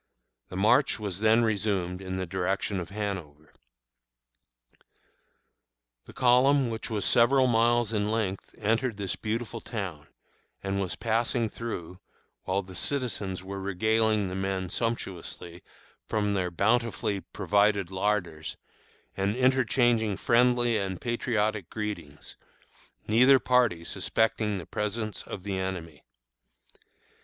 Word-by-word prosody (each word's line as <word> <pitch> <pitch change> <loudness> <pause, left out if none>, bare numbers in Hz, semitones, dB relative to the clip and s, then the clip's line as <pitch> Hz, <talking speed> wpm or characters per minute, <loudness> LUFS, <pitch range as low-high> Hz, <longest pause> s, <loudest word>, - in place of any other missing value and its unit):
The - - -8
march 120 +7 +3
was 100 -4 -3
then 110 +2 +4
resumed 100 -4 0
in 95 -1 -4
the 95 - -2
direction 95 +2 -1
of 90 -1 -6
Hanover. 95 -8 -5 2.5
The - - -12
column, 130 +1 +4
which 110 +1 -5
was 105 -3 -1
several 130 +3 +4
miles 120 -1 +3
in 105 -1 0
length, 105 -4 -2
entered 115 +1 0
this 100 -2 -3
beautiful 115 +1 -4
town, 95 -10 -5 0.6
and 100 0 -1
was 95 -2 -3
passing 115 0 0
through, 90 -7 -6 0.5
while 95 +2 0
the 95 0 -12
citizens 100 -5 -2
were 95 +1 -6
regaling 110 +2 +1
the 90 - -5
men 95 -1 -2
sumptuously 90 -6 -4 0.5
from 105 -2 +1
their 95 -2 0
bountifully 110 +2 +1
provided 100 -2 +1
larders, 95 -5 -1 0.6
and 100 +2 0
interchanging 120 -4 +2
friendly 120 -1 +3
and 95 -2 -3
patriotic 110 -5 -1
greetings, 100 -9 -6 0.7
neither 125 +5 +6
party 125 -10 +2
suspecting 105 +3 0
the 90 - -7
presence 105 +2 -3
of 95 - -8
the 95 -1 -2
enemy. 90 -5 -5
105 Hz, 115 wpm, -28 LUFS, 95-115 Hz, 2.5 s, neither